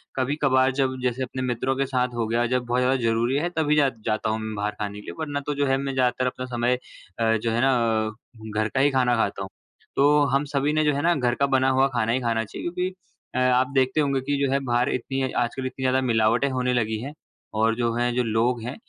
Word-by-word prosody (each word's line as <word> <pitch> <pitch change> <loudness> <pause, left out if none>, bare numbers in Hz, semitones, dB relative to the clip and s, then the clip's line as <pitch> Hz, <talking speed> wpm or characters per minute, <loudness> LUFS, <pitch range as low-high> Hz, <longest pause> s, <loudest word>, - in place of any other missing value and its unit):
कभी-कभार 130 -1 +2
जब 130 -1 +1
जैसे 125 +1 -1
अपने 130 +1 -5
मित्रों 130 +1 -1
के 135 - +1
साथ 125 -2 -1
हो 115 -1 0
गया, 120 +2 +1
जब 125 +1 0
बहुत 120 +1 0
ज़्यादा 130 +1 +2
ज़रूरी 115 +3 +1
है 175 - -1
तभी 150 -1 +2
जा 145 -3 +4 0.2
जाता 110 -1 0
हूँ 110 0 -1
म 110 0 -4
बाहर 105 +1 -1
खाने 105 -1 -4
के - - -13
लिए - - -6
वरना 145 -2 -2
तो 145 - -1
जो 145 - +1
है 135 - +3
मैं 135 0 -3
ज़्यादातर 130 0 +1
अपना 125 0 -4
समय 120 +1 +2 0.4
अ, 115 0 +3
जो 115 +1 -2
है 115 +1 +1
ना 115 -4 +2 0.5
घर 110 - +2
का 130 - -1
ही 145 +2 +4
खाना 125 -2 +2
खाता 100 -3 -1
हूँ। 95 - -7 0.5
तो 145 +2 +4
हम 140 +1 +3
सभी 145 +1 0
ने 155 0 +2
जो 150 -1 +2
है 140 - -1
ना 175 +2 +3
घर 125 -2 0
का 140 - +2
बना 130 0 +3
हुआ 130 +1 +3
खाना 115 -2 +1
ही 130 - +1
खाना 115 -2 0
चाहिए। 105 - -8
क्योंकि 180 +1 -2 0.5
अ, - - +1
आप 125 0 +3
देखते 130 +3 +2
होंगे 140 -2 0
कि 140 +2 -1
जो 130 - -1
है 135 - +2
बाहर 120 +2 +1
इतनी 135 +2 -2
आजकल 120 +2 -2
इतनी 130 +1 -5
ज़्यादा 130 0 +2
मिलावटें 115 +2 +2
होने 125 -1 0
लगी 110 -3 0
हैं 140 +4 -6 0.5
और 115 0 +3
जो 120 -1 0
है 120 0 +1
जो 125 - +2
लोग 115 +2 0
हैं 125 +3 -5
125 Hz, 250 wpm, -24 LUFS, 115-135 Hz, 0.5 s, जा